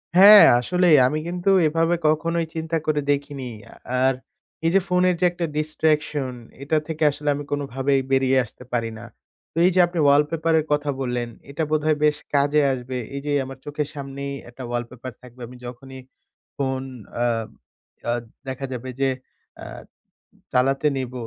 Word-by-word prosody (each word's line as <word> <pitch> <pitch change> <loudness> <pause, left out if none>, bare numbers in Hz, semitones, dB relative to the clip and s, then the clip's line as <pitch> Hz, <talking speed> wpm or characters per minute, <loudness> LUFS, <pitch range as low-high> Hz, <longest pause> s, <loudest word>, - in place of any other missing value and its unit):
হ্যাঁ, 205 +3 +10 0.2
আসলেই। 180 +4 +3
আমি 155 +3 -1
কিন্তু 175 +2 -1 0.2
এভাবে 165 +2 +1
কখনোই 165 +2 +1
চিন্তা 160 +1 -2
করে 150 -1 +1
দেখিনি। 140 -3 -3 0.2
আ - - -14 0.3
আর 135 - +4 0.5
এই 165 - +3
যে 195 - +6
ফোনের 180 0 +2
যে 180 - +3
একটা 175 -1 -3
distraction 150 -3 0 0.3
এটা 155 +3 +1
থেকে 160 -1 -3
আসলে 145 +1 -3
আমি 145 - -5
কোনোভাবেই 135 -1 0
বেরিয়ে 135 0 +3
আসতে 120 - -13
পারি 115 -1 0
না। - - -10 0.5
তো - - -12
এই 185 - +5
যে - - +4
আপনি 175 -1 -4
wallpaper 155 +3 +2
এর 150 - -3
কথা 145 0 -1
বললেন, 125 -2 -2 0.2
এটা 150 +3 -2
বোধহয় 155 0 +2
বেশ 150 -1 +3 0.2
কাজে 145 +2 +3
আসবে। 125 0 -5 0.2
এই 140 - -4
যে 145 - -1
আমার 135 0 -9
চোখের 145 0 -3
সামনেই 140 0 -6 0.2
একটা 125 +2 -10
wallpaper 120 +1 -5
থাকবে। 125 0 -15
আমি 125 0 -12
যখনই 130 +2 -9 0.6
ফোন, 130 -1 -1 0.3
অ্যা 120 0 +1 0.7
অ্যা 120 - 0 0.3
দেখা 130 +1 -4
যাবে 125 +1 -6
যে 135 - +3 0.5
অ্যা - - -9 0.8
চালাতে 135 +3 +2
নিব, 130 -1 -4
145 Hz, 165 wpm, -23 LUFS, 130-155 Hz, 0.8 s, হ্যাঁ